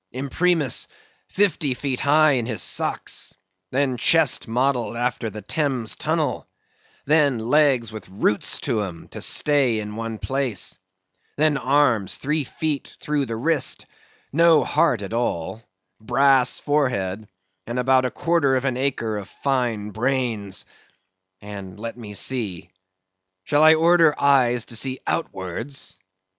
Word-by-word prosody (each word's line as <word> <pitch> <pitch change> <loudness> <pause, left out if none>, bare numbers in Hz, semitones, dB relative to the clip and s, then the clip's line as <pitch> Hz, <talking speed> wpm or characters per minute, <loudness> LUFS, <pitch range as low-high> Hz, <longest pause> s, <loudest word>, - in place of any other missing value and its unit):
Imprimis, 140 +2 0 0.4
fifty 175 -9 0
feet 130 -1 -3
high 150 +2 +4
in 120 -4 0
his 110 -4 -1
socks; - - -1 0.3
then, 130 0 0
chest 155 +2 +3
modelled 120 0 0
after 120 -1 -2
the 105 -1 -9
Thames 130 -3 -1
Tunnel; - - -2 0.6
then, 145 -3 +3
legs 125 -1 +2
with 110 -3 -9
roots 105 +2 0
to 120 -6 -1
'em, 90 -5 -7
to - - -8
stay 135 -7 +4
in 105 0 -6
one 115 0 -5
place; 135 -3 -2 0.6
then, 155 0 +2
arms 130 -7 +2
three 150 +2 0
feet 150 +1 -4
through 145 -3 -1
the 115 - -4
wrist; 140 +3 +1 0.5
no 165 0 +5
heart 110 -5 +1
at 100 - -7
all, 115 -3 -2 0.4
brass 135 +3 +3
forehead, 110 -9 -1 0.4
and 120 +2 -4
about 130 +1 +3
a 125 - 0
quarter 160 -2 +1
of 130 +1 -1
an 130 -2 -1
acre 125 -5 -2
of 100 - -10
fine 120 -6 -2
brains; 115 -4 -1 0.8
and 100 -2 -9
let 115 +1 -6
me 105 -4 -9
see—shall 95 - -4
I 155 +1 +7
order 165 -1 +4
eyes 125 -4 +3
to 115 - -6
see 130 +3 -2
outwards? 100 - -4
125 Hz, 130 wpm, -22 LUFS, 110-145 Hz, 0.8 s, I